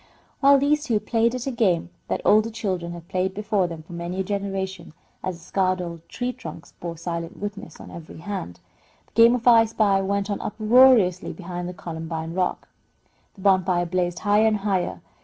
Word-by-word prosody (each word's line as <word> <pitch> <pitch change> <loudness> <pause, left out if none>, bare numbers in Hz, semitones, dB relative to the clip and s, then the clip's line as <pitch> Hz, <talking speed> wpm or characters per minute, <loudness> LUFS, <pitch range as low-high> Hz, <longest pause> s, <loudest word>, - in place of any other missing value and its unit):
While 280 0 +6
these 295 +2 +2
two 230 -7 +1
played 230 +2 +1
at 250 - -4
a 270 - -1
game 185 -8 +1 0.2
that - - -2
older 215 +2 +5
children 185 -6 -3
had 170 -1 -10
played 190 +1 -1
before 210 -3 0
them 165 -2 -8
for 175 - -12
many 170 +2 -4
a - - +1
generation 195 -3 -4 0.3
(as 185 -2 -3
the 165 - -17
scarred 185 0 0
old 170 -2 -7
tree 250 +1 -3
trunks 245 -9 -10
bore 170 -1 -5
silent 170 0 -5
witness 205 -5 -7
on - - -11
every 165 -2 -10
hand), 170 - -6 0.5
the - - -33
game 230 +1 +6
of 245 0 -3
"I 230 -2 +7
spy" 210 -3 +2
went 200 +1 -1
on 200 - -2
uproariously 215 -4 +4
behind 175 -1 -6
the 180 - -8
columbine 160 0 -5
rock. 180 0 -1 0.7
The 195 - -14
bonfire 185 -2 +3
blazed 175 0 -1
higher 210 +3 +3
and 215 -1 +2
higher. 195 -3 -1
190 Hz, 190 wpm, -24 LUFS, 175-215 Hz, 0.7 s, I